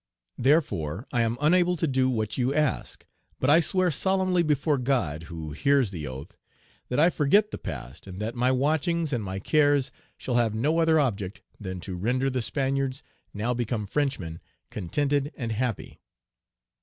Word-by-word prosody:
Therefore, 115 Hz, -, +1 dB
I 120 Hz, -, +2 dB
am 115 Hz, +1 st, 0 dB
unable 175 Hz, +4 st, +3 dB
to 165 Hz, -, 0 dB
do 130 Hz, -3 st, +2 dB
what 110 Hz, -4 st, -1 dB
you 130 Hz, +2 st, 0 dB
ask; 150 Hz, -3 st, -1 dB, 0.3 s
but 130 Hz, -, +3 dB
I 160 Hz, -, +7 dB
swear 180 Hz, +2 st, +1 dB
solemnly 185 Hz, +2 st, +1 dB
before 150 Hz, -2 st, +1 dB
God, 95 Hz, -, -1 dB
who 80 Hz, -2 st, -6 dB
hears 135 Hz, -, +2 dB
the 80 Hz, -6 st, -5 dB
oath, 65 Hz, +5 st, -8 dB, 0.5 s
that 125 Hz, -, 0 dB
I 165 Hz, +4 st, +5 dB
forget 200 Hz, +9 st, +3 dB
the -, -, -5 dB
past, 65 Hz, -1 st, -7 dB
and 95 Hz, 0 st, -8 dB
that 110 Hz, +2 st, -3 dB
my 125 Hz, +1 st, +2 dB
watchings 155 Hz, +4 st, +1 dB
and 120 Hz, -3 st, -1 dB
my 95 Hz, -1 st, -4 dB
cares 145 Hz, +5 st, +2 dB, 0.3 s
shall 125 Hz, -2 st, -1 dB
have 115 Hz, -3 st, +1 dB
no 150 Hz, +9 st, +1 dB
other 160 Hz, -1 st, +4 dB
object 105 Hz, -8 st, -2 dB, 0.2 s
than 95 Hz, -3 st, -5 dB
to 95 Hz, 0 st, -6 dB
render 125 Hz, +8 st, 0 dB
the 130 Hz, -1 st, -1 dB
Spaniards, 135 Hz, +1 st, -1 dB, 0.3 s
now 110 Hz, +4 st, -1 dB
become 115 Hz, -3 st, -2 dB
Frenchmen, 100 Hz, -, -2 dB, 0.3 s
contented 140 Hz, -, -1 dB
and 115 Hz, -6 st, -3 dB
happy." 115 Hz, -1 st, -3 dB
130 Hz, 170 wpm, -26 LUFS, 105-150 Hz, 0.5 s, I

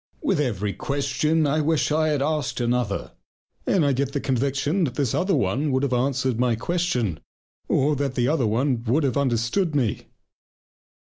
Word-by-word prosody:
With 195 Hz, -, +1 dB
every 105 Hz, -8 st, -1 dB
question 145 Hz, +3 st, 0 dB
I 150 Hz, +2 st, +1 dB
wish 155 Hz, 0 st, +1 dB
I 155 Hz, +1 st, +2 dB
had 145 Hz, -3 st, +1 dB
asked 145 Hz, -5 st, -1 dB
another, 120 Hz, -4 st, -1 dB, 0.6 s
and 180 Hz, -6 st, +3 dB
I 140 Hz, -, +2 dB
get 135 Hz, +1 st, -1 dB
the 140 Hz, -, 0 dB
conviction 140 Hz, +7 st, 0 dB
that 130 Hz, -4 st, -4 dB
this 140 Hz, -6 st, 0 dB
other 190 Hz, +1 st, +1 dB
one 125 Hz, +10 st, 0 dB
would 130 Hz, +1 st, +1 dB
have 135 Hz, -2 st, 0 dB
answered 130 Hz, -1 st, 0 dB
my 125 Hz, -2 st, +2 dB
question, 125 Hz, -, -1 dB, 0.5 s
or, 145 Hz, +2 st, +2 dB
that 140 Hz, -1 st, -2 dB
other 135 Hz, -4 st, +1 dB
one 120 Hz, +2 st, 0 dB
would 135 Hz, +7 st, +2 dB
have 135 Hz, -4 st, 0 dB
understood 140 Hz, -, 0 dB
me. 120 Hz, -8 st, -1 dB
135 Hz, 165 wpm, -24 LUFS, 120-150 Hz, 0.6 s, and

